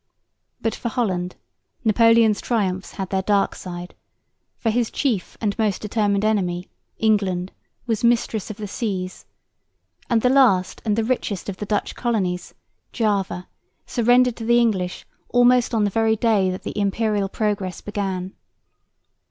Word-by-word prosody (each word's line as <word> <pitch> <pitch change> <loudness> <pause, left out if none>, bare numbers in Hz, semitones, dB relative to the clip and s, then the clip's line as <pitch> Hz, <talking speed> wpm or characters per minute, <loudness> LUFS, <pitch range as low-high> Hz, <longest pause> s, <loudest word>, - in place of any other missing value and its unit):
But 225 - 0
for 235 - -4
Holland 185 -7 -1 0.5
Napoleon's 230 -1 +5
triumphs 195 -5 -1
had 190 -1 -5
their 190 -1 +1
dark 200 0 +2
side, 175 -1 -8 0.6
for 225 - 0
his 235 0 +1
chief 235 -10 -1
and 205 -3 -1
most 210 -4 +1
determined 205 -1 0
enemy, 185 -4 0 0.3
England, 195 -4 +1 0.3
was 225 -3 -1
mistress 230 -3 +1
of 215 - -6
the 210 -2 -5
seas; 190 -3 -4 0.8
and 230 -3 +2
the 250 - +5
last 230 -10 +3
and 210 -2 +2
the 225 - +1
richest 220 -5 -2
of 190 - -5
the 210 - -5
Dutch 205 0 -1
colonies, 190 -7 -2 0.4
Java, 200 -5 -1 0.4
surrendered 245 0 +3
to 230 - -6
the 235 +1 +4
English 195 -7 0 0.2
almost 245 0 +4
on 225 -3 +2
the 205 - +1
very 225 +1 +2
day 210 -4 +2
that 185 0 -5
the - - -5
Imperial 205 0 0
progress 200 -4 -2
began. 195 -3 -3
210 Hz, 145 wpm, -22 LUFS, 190-230 Hz, 0.8 s, Napoleon's